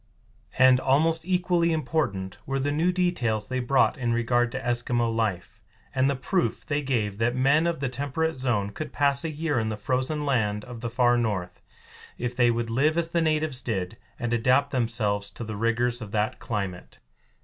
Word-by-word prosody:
And 130 0 +6
almost 160 +5 +2
equally 180 -2 +2
important 130 - -2
were 135 0 -1
the 140 +2 0
new 165 +5 +2
details 125 - 0
they 130 0 -2
brought 135 +3 +2
in 120 -2 0
regard 120 0 +1
to - - -3
Eskimo 120 -1 0
life, 105 -1 -2 0.3
and 135 0 +2
the 140 - 0
proof 170 +8 -1
they 145 -1 -1
gave 110 -7 -1
that 120 +2 +1
men 140 +6 +3
of 170 -4 -2
the 135 - 0
temperate 145 +5 -2
zone 120 -8 -1
could 155 +9 -6
pass 140 0 +2
a 165 - -2
year 150 -3 -1
in 110 -1 -1
the 110 - -3
frozen 130 +6 -1
land 105 -6 0
of 120 -2 -9
the 120 - -3
far 120 0 +3
north 95 -6 -2 0.6
if 120 0 -3
they 120 -1 +4
would 115 -1 -1
live 150 +7 +2
as 170 -1 0
the 170 0 +1
natives 155 -4 0
did, 100 -5 -3 0.2
and 120 -1 -2
adapt 125 +4 +3
themselves 110 -5 0
to 110 - -8
the 110 -1 -5
rigors 115 +3 0
of 110 - -6
that 110 +3 0
climate. 100 -6 -4
125 Hz, 190 wpm, -26 LUFS, 115-145 Hz, 0.6 s, And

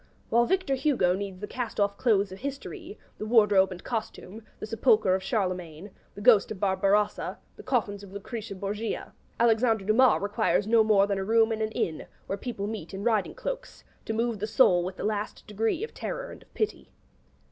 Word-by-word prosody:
'While 235 +1 +4
Victor 370 -6 +1
Hugo 265 -10 +2
needs 195 -1 -6
the 210 - -4
cast 245 -2 -5
off 200 0 +2
clothes 200 -4 +2
of 190 - -9
history, 320 +8 -7 0.2
the 215 - -4
wardrobe 210 -4 +5
and 180 -1 -8
costume, 220 -2 -5 0.2
the - - -5
sepulchre 215 -3 +3
of 190 - 0
Charlemagne, 185 -3 -3 0.2
the 205 - -8
ghost 210 -2 +5
of 215 - -6
Barbarossa, 200 +1 +1 0.2
the - - -11
coffins 220 -6 -1
of 200 -2 -12
Lucretia 205 +1 -6
Borgia, 205 +4 -4 0.3
Alexandre 225 -2 +3
Dumas 230 +3 +4
requires 205 0 +1
no 225 +1 +4
more 210 -2 +4
than 200 -1 -1
a - - -2
room 225 +2 +3
in 220 0 -2
an 215 - 0
inn, 160 -2 -2 0.2
where 195 - -3
people 200 -2 -5
meet 205 -4 -6
in 195 - -5
riding 220 -3 +1
cloaks, - - -6 0.2
to 220 - -2
move 230 -1 -1
the 210 - -2
soul 185 -6 +4
with 185 +1 -5
the - - -5
last 210 -1 -3
degree 220 - -1
of 455 - -6
terror - - -5
and - - -12
of - - -22
pity.' 430 - -2
215 Hz, 195 wpm, -27 LUFS, 195-235 Hz, 0.3 s, wardrobe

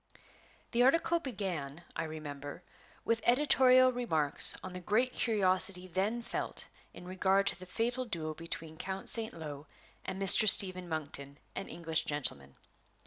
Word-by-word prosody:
The 235 - +1
article 330 +6 +2
began, 180 - -5
I - - -3
remember, 145 0 -8 0.4
with 230 0 0
editorial 255 -1 +4
remarks 160 - +4
on 185 - -8
the 180 - -7
great 220 +8 0
curiosity 190 -4 -1
then 200 +7 -2
felt - - -5 0.3
in - - -13
regard 190 +1 +1
to - - 0
the 185 - -11
fatal 240 +6 -3
duel 160 -8 -4
between 165 0 -7
the - - -5
Count 190 0 -5
St. 225 -1 +5
Lo 150 -3 -9 0.4
and 190 - -6
Mr. 195 +2 +7
Stephen 185 -2 +4
Monkton, 140 -3 -6 0.2
an - - -6
English 165 -1 -1
gentleman. 125 - -3
185 Hz, 145 wpm, -31 LUFS, 160-230 Hz, 0.4 s, Mr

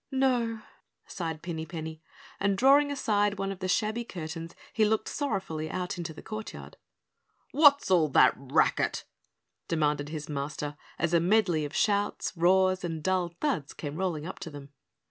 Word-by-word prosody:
"No," 245 -4 +1 0.4
sighed 165 -3 -5
Pinny 165 -2 -4
Penny, 160 -1 -6 0.4
and 200 -1 +1
drawing 280 +5 +5
aside 205 -6 +1
one 195 0 -2
of 195 - -7
the 185 - -2
shabby 215 +4 0
curtains 165 -5 -7 0.2
he 220 - +3
looked 215 0 +1
sorrowfully 190 - -2
out 180 -1 -3
into 170 -2 -4
the 155 - -11
courtyard. 215 0 -7 0.7
"What's 285 -7 +5
all 170 -4 +5
that 140 - +5
racket?" 135 0 +1 0.6
demanded 150 -3 0
his 150 -1 -5
Master, 145 0 -4 0.2
as 170 0 0
a 170 - +6
medley 175 -4 +2
of 145 - -7
shouts, 205 -1 +1
roars, 185 +2 +3
and 165 -3 -4
dull 180 -2 0
thuds 255 - -1
came 145 -1 -5
rolling 170 -4 -2
up 185 - -7
to 165 - -6
them. 145 -2 -10
180 Hz, 160 wpm, -29 LUFS, 160-210 Hz, 0.7 s, a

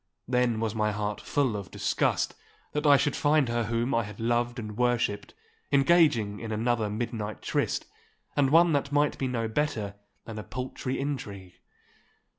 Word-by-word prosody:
Then 125 -2 +2
was 110 -2 -1
my 105 -1 +1
heart 105 0 -3
full 135 -7 0
of 100 -2 -5
disgust - - 0 0.4
that 150 0 0
I 145 -1 +8
should 145 0 0
find 150 -2 +3
her 120 -1 0
whom 115 +3 0
I 115 - +3
had 105 +2 -9
loved 120 +1 0
and 105 -3 -6
worshipped 120 -4 0 0.4
engaging 135 -8 +4
in 115 -1 -5
another 110 0 0
midnight 110 -1 -4
tryst, - - -1 0.5
and 140 -2 +3
one 165 +2 +5
that 140 0 0
might 145 0 +2
be 135 - 0
no 115 -3 -1
better 110 -5 -1 0.3
than 110 -2 -6
a - - -6
paltry 130 +1 -4
intrigue. 100 -10 -5
120 Hz, 165 wpm, -28 LUFS, 110-140 Hz, 0.5 s, I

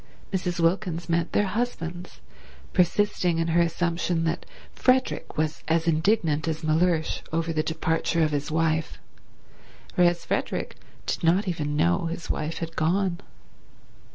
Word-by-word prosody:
Mrs. 180 -2 -1
Wilkins 170 -1 0
meant 170 0 +1
their 205 - +2
husbands, 180 -6 -4 0.5
persisting 180 -1 +2
in 165 0 0
her 170 +1 +4
assumption 170 0 0
that 165 - -2 0.3
Frederick 255 0 +1
was 155 0 -1
as 165 +1 +1
indignant 160 -2 +2
as 160 -1 -2
Mellersh 160 +1 +1
over 165 0 0
the 155 - +1
departure 160 +1 0
of 155 - +1
his 145 -1 -2
wife, 160 0 0 1.0
whereas 175 -1 +3
Frederick - - -2 0.3
did - - -2
not 180 +5 +3
even 150 -4 -2
know 85 - +2
his 165 0 -4
wife 155 +2 -3
had 165 0 -5
gone. 175 +2 +1
165 Hz, 135 wpm, -26 LUFS, 160-175 Hz, 1.0 s, her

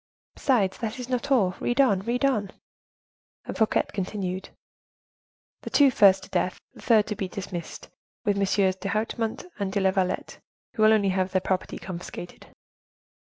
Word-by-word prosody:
Besides, 215 -9 +1
that 230 +1 -3
is 250 -1 -7
not 255 +2 -2
all. 205 -10 +3
Read 240 +2 -1
on, 245 -9 +4
read 240 +6 -1
on;" 215 -8 +1 1.0
and - - -5
Fouquet 220 - +2
continued,—"The 190 -1 -8
two 280 -2 +5
first 195 -4 +5
to - - -12
death, 180 - -1
the - - -14
third 220 -3 +4
to 210 - -4
be 195 -2 -3
dismissed, 180 -3 -7 0.4
with 205 -2 +2
MM. 195 -1 +1
d'Hautemont 220 - -2
and 200 -1 -1
de 200 - 0
la 190 -1 +3
Vallette, 190 -1 -2 0.3
who 220 - -3
will 215 0 +7
only 205 -3 +3
have 185 0 0
their 185 - +3
property 185 0 -2
confiscated." 175 -1 -8
200 Hz, 155 wpm, -26 LUFS, 190-225 Hz, 1.0 s, will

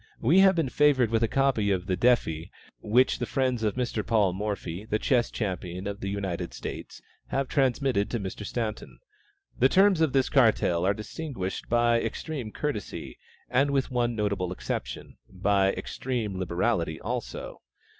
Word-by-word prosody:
We 160 +11 +4
have 190 -1 +6
been 160 -6 0
favored 130 -5 +3
with 115 0 +2
a 115 - +3
copy 135 -5 +1
of 95 -2 0
the 95 -2 0
defi 90 -8 +1 0.3
which 125 +5 +2
the - - -2
friends 130 -3 0
of 105 -2 0
Mr. 120 -4 -1
Paul 105 -5 +2
Morphy, 100 -2 -4
the 110 0 -1
chess 120 +1 +1
champion 90 -3 -4
of 100 0 -4
the 100 - -4
United 100 -4 -3
States, - - -7 0.2
have 135 0 -1
transmitted 130 -6 +1
to 120 - -2
Mr. 100 +1 -5
Staunton. 110 0 -4 0.6
The 130 - +5
terms 190 -1 +4
of 160 -4 +3
this 135 -1 +2
cartel 105 -9 +3
are 100 - +2
distinguished 110 -3 -5
by 120 0 +3
extreme 120 0 -4
courtesy, 145 -7 -5 0.3
and 130 +3 +2
with 140 -1 0
one 120 -1 0
notable 100 -4 -1
exception, 65 -8 -5
by 95 +1 +2
extreme 115 -7 -3
liberality 85 -2 0
also. 120 +2 -5
115 Hz, 160 wpm, -27 LUFS, 100-130 Hz, 0.6 s, have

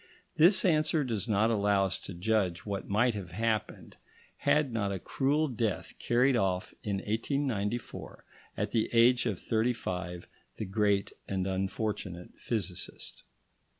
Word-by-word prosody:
This 185 +5 +6
answer 155 -2 +3
does 115 -4 -2
not 110 +1 +3
allow 100 -2 +3
us 95 - -2
to 95 - -8
judge 95 -3 0
what 100 -2 -4
might 115 +4 +3
have 100 -4 -6
happened, 110 +1 -2 0.4
had 150 -5 +2
not 100 -3 0
a 95 - -2
cruel 145 - 0
death 110 - -2
carried 125 +3 +3
off 95 -5 0
in 100 -2 -1
1894, 115 +1 -2 0.3
at - - -1
the 110 - +1
age 120 +1 +5
of 100 -6 -2
thirty 115 +2 +1
five, 90 -5 -5 0.3
the 110 - -3
great 100 0 +1
and 95 -1 -1
unfortunate 95 -1 -3
physicist. 95 -7 -4
110 Hz, 140 wpm, -30 LUFS, 95-120 Hz, 0.4 s, This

